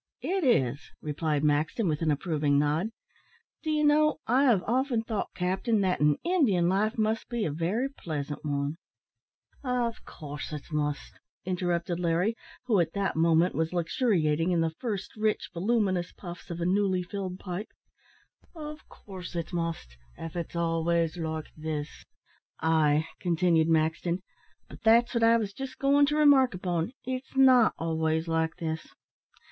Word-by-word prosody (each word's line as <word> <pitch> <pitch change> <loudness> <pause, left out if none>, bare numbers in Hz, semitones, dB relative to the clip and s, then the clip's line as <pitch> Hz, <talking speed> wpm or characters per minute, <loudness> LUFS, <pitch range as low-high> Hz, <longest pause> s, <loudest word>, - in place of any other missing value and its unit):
"It 380 0 0
is," 140 - +2 0.2
replied 150 -1 -1
Maxton, 150 +8 +1
with 150 -1 -1
an 160 - +1
approving 150 -2 +1
nod. 150 +6 +1 0.7
"Do 315 - -4
you 305 -1 +1
know, 305 +1 +4
I 260 +4 +3
have 225 -9 +4
often 250 -1 0
thought, 220 -2 -3
captain, 190 +4 0
that 185 -2 +1
an 150 -1 +3
Indian 255 - +2
life 210 +5 +1
must 220 0 0
be 235 -3 -1
a 155 - -1
very 180 - -1
pleasant 150 - -5
one 145 +1 -2 0.5
" - - -36
"Av 245 -3 -1
coorse 145 -1 -8
it 150 - -5
must," 150 -1 -3 0.3
interrupted 175 -1 -1
Larry, 180 +6 +1 0.3
who 220 -6 +3
at 165 -1 0
that 200 -1 -1
moment 165 +2 +3
was 160 +2 -1
luxuriating 170 - +1
in 170 -2 +2
the 165 -1 0
first 210 -6 -4
rich, 215 0 -1
voluminous 190 -1 0
puffs 175 -2 -10
of 170 -1 -5
a 170 - -1
newly 190 0 +2
filled 185 0 -5
pipe 185 +3 -5 0.9
"av 305 -1 -7
coorse 185 -3 -10
it 170 +1 -4
must, 165 - -3 0.2
if 165 0 -7
it's 170 0 -4
always 165 0 +1
like 160 -2 -4
this." 155 -1 -5 0.5
"Ay," 155 -1 +3
continued 170 -2 +2
Maxton, 165 +3 +1 0.4
"but - - -13
that's 235 +2 +4
what 235 - +1
I 230 0 +6
was 210 -3 -3
just 260 +3 -7
going 280 +1 +4
to 295 - 0
remark 275 -7 +5
upon 175 0 -2
it's 260 +1 -5
not 255 -4 +6
always 160 0 -1
like 160 0 0
this. 160 -1 -4
175 Hz, 155 wpm, -28 LUFS, 160-225 Hz, 0.9 s, I